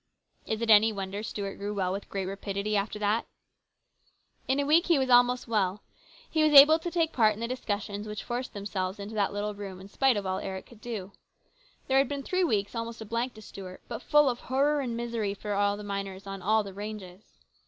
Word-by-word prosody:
Is 220 +1 -2
it 225 - +3
any 215 +1 +7
wonder 200 0 -4
Stuart 205 -2 -5
grew 205 +1 -4
well 185 -2 0
with 195 +2 -5
great 195 -1 -3
rapidity 200 +2 -3
after 205 +1 -1
that? 210 +2 0 1.2
In 265 +2 +1
a 285 - +1
week 320 +4 +4
he 340 -3 +4
was 260 -1 0
almost 245 +1 +4
well. 205 -3 0 0.4
He 315 - 0
was 305 -1 +4
able 310 +3 +7
to 345 - -4
take 330 -2 0
part 215 -3 +4
in - - -11
the 230 - -2
discussions 210 -4 -3
which 210 -1 -5
forced 245 0 -4
themselves 195 -1 -3
into 200 +2 -7
that 205 -2 +1
little 205 +1 -3
room 200 -2 -8
in 190 - -11
spite 265 +1 +2
of 200 - -3
all 190 0 -1
Eric 190 0 -5
could 230 -3 -17
do. 210 -5 -5 0.8
There 265 0 +4
had 270 - +2
been 280 -1 -3
three 370 +4 0
weeks 205 - 0
almost 230 0 -5
a - - -6
blank 230 +3 -2
to 215 - -12
Stuart, 185 -2 -10
but 230 -2 -6
full 295 -1 +4
of 245 -2 0
horror 285 +3 +1
and 240 -3 -3
misery 230 -4 -2
for 205 0 -4 0.2
the 210 - -8
miners 200 -1 -5
on 195 -1 -6
all 215 +3 +2
the 195 -1 -8
ranges. 205 -2 -9
215 Hz, 220 wpm, -28 LUFS, 200-245 Hz, 1.2 s, any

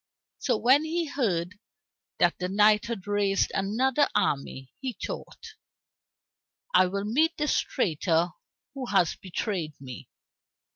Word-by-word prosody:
So 245 -5 +1
when 260 +7 +4
he 330 +2 -1
heard 205 - -2 0.6
that - - +2
the 180 0 -2
knight 210 +2 +4
had 230 -6 -5
raised 205 -1 +1
another 250 +9 +1
army, 135 -1 -1
he 260 -2 -4
thought, 455 -2 -8 1.2
"I 185 - +6
will 200 +2 -3
meet 310 +10 +1
this 300 -1 +1
traitor 170 - 0 0.4
who 265 -2 -5
has 190 -6 +2
betrayed 185 -4 -4
me. 130 -3 -10
205 Hz, 125 wpm, -27 LUFS, 180-265 Hz, 1.2 s, I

